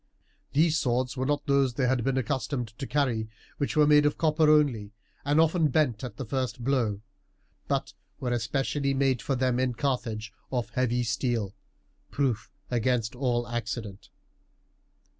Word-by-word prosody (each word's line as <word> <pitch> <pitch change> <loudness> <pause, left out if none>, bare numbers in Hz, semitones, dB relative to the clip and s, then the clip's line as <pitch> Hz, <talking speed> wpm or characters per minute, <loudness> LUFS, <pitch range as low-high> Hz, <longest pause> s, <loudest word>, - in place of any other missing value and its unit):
These 160 +2 +3
swords 125 -1 0
were 130 0 -1
not 145 0 0
those 140 -4 +2
they 130 - +1
had 125 -1 +1
been 135 +1 0
accustomed 130 -2 -2
to 135 - -4
carry, 120 -7 0 0.3
which 145 +2 -1
were 150 - +6
made 150 0 +6
of 145 - -1
copper 155 -1 +3
only, 130 -9 +3 0.3
and 145 +2 +2
often 165 0 +4
bent 135 -5 +1
at 125 - -6
the 135 - -4
first 125 -1 -3
blow, 115 -6 0 0.7
but - - -1 0.3
were 125 - -2
especially 135 +4 0
made 135 -3 +2
for 135 - -1
them 125 -1 +1
in 130 -2 0
Carthage 115 -5 -2 0.2
of 125 -3 -2
heavy 125 -2 +1
steel, 115 -3 -1 0.6
proof 130 -6 -1 0.2
against 120 -1 0
all 120 -2 0
accident. 115 -4 -5
130 Hz, 155 wpm, -28 LUFS, 120-140 Hz, 0.7 s, were